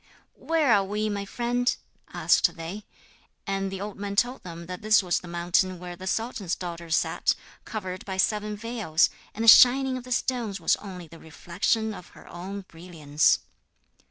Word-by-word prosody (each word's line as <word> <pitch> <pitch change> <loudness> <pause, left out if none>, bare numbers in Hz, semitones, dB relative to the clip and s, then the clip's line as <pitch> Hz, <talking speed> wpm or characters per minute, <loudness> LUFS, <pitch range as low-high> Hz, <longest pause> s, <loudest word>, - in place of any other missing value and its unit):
'Where 315 -7 +2
are 200 -2 +4
we, 210 +2 -2
my 200 -1 -3
friend?' 245 +3 0 0.4
asked - - +3
they; 175 +5 -7 0.6
and 195 -1 -2
the 195 - -5
old 205 +1 -6
man 200 0 -4
told 245 +5 +1
them 170 -1 -9
that 180 +1 -7
this 215 -1 +4
was 180 -1 +1
the 180 - -12
mountain 175 +2 0
where 175 0 -8
the 185 +2 -9
sultan's 215 -4 -2
daughter 170 -2 -7
sat, 160 - +1 0.3
covered 185 -4 -5
by 190 -1 -5
seven 210 +2 0
veils, 215 -7 +1 0.2
and 220 - -2
the - - 0
shining 255 +3 +7
of 250 - -8
the 255 - -11
stones 240 -5 -1
was 165 - +3
only 185 -4 -9
the 165 +1 -14
reflection 185 +8 -1
of 180 - -10
her - - -15
own 190 +3 -7
brilliance. 165 -5 0
195 Hz, 175 wpm, -26 LUFS, 175-220 Hz, 0.6 s, shining